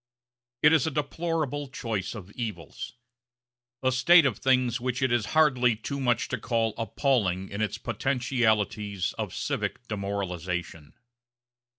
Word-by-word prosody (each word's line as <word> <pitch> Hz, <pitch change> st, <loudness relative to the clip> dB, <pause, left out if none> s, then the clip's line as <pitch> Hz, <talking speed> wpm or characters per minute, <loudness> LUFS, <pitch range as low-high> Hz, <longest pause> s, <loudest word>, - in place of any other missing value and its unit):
It 150 Hz, +1 st, +7 dB
is 160 Hz, -2 st, +4 dB
a -, -, +2 dB
deplorable 150 Hz, -1 st, -2 dB
choice 115 Hz, -6 st, -3 dB
of 100 Hz, -2 st, -9 dB
evils; 105 Hz, -, -6 dB, 0.9 s
a 130 Hz, -, +3 dB
state 165 Hz, +6 st, +6 dB
of 125 Hz, -8 st, 0 dB
things 130 Hz, -2 st, +2 dB
which 125 Hz, 0 st, -1 dB
it 130 Hz, -, +2 dB
is 120 Hz, -3 st, +1 dB
hardly 125 Hz, -7 st, +4 dB
too 140 Hz, +6 st, -5 dB
much 120 Hz, -2 st, +1 dB
to 125 Hz, -, -2 dB
call 115 Hz, -1 st, 0 dB
appalling 110 Hz, -6 st, 0 dB
in 100 Hz, +2 st, -4 dB
its 105 Hz, -1 st, -1 dB
potentialities 110 Hz, -5 st, 0 dB
of -, -, -2 dB
civic -, -, -3 dB
demoralization. 90 Hz, -6 st, -4 dB
120 Hz, 130 wpm, -27 LUFS, 100-130 Hz, 0.9 s, It